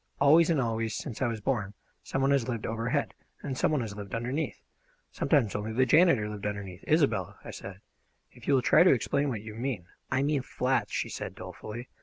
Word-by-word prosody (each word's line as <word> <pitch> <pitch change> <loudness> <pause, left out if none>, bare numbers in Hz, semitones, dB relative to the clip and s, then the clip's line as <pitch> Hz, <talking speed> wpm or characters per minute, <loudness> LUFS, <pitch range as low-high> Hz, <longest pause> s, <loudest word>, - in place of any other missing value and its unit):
Always 160 +4 +6
and 160 -4 +3
always, 115 -3 -1
since 125 -8 -6
I 130 - +3
was 115 -2 -3
born, 105 -5 -1 0.3
some 135 - -2
one 135 - +3
has 135 -4 +2
lived 115 -3 -3
overhead, 115 +6 -1 0.3
and 135 -3 -3
some - - +1
one 150 -4 +1
has 105 -3 -5
lived 100 -1 -6
underneath. 125 +7 -2 0.5
Sometimes 135 -10 +1
only 105 +2 -3
the 130 +3 +3
janitor 155 -8 +5
lived 105 -1 -4
underneath 100 -3 -6
" - - -25
"Isobel," 155 -3 +2
I - - -6
said, - - -9 0.5
"if - - -15
you 140 - +5
will 130 - +2
try - - +6
to 180 - +7
explain 140 +3 0
what 110 -5 -4
you 110 -1 -8
mean 115 -5 -3
" - - -39
"I 130 +1 +2
mean 145 -1 +1
flats," - - -1
she - - -2
said - - -6
dolefully. 120 +4 -8
125 Hz, 220 wpm, -29 LUFS, 110-140 Hz, 0.5 s, to